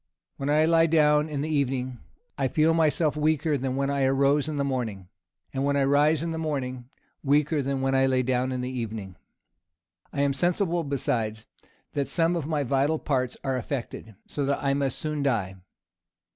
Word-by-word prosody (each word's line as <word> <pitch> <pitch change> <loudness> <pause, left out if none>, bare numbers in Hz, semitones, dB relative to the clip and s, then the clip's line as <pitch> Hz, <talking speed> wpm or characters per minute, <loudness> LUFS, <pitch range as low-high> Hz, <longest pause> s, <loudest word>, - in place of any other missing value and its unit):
When 140 +1 -3
I 155 +2 +4
lie 165 0 +4
down 150 -1 +3
in 145 -2 -3
the 155 +1 -1
evening, 130 -3 -1 0.4
I 135 -2 0
feel 155 +5 +3
myself 155 -2 +2
weaker 155 0 +1
than 130 -1 -2
when 140 +1 0
I 140 -1 +1
rose 140 +2 +2
in 150 - -3
the 140 - +1
morning; 115 -9 -3 0.4
and 135 0 -1
when 140 0 +1
I 140 - +3
rise 145 +3 +3
in 165 - -2
the 160 - -3
morning, 130 -5 -3 0.3
weaker 150 +2 +2
than 135 0 -2
when 135 0 +1
I 135 0 +4
lay 130 -1 +2
down 130 +1 0
in 125 -1 -2
the 125 +1 -3
evening. 110 -6 -5 1.0
I 140 - -2
am 140 -1 +2
sensible 175 +2 0
besides, 115 -6 -2 0.5
that 140 -1 -1
some 165 0 +2
of 160 -4 -3
my 150 -3 0
vital 140 +4 +1
parts 130 -5 -1
are 135 -1 0
affected, 120 -4 -5
so 145 - -3
that 140 +1 -1
I 140 -1 +2
must 140 -2 -1
soon 150 -1 -3
die." 105 -9 -1
140 Hz, 190 wpm, -26 LUFS, 130-150 Hz, 1.0 s, I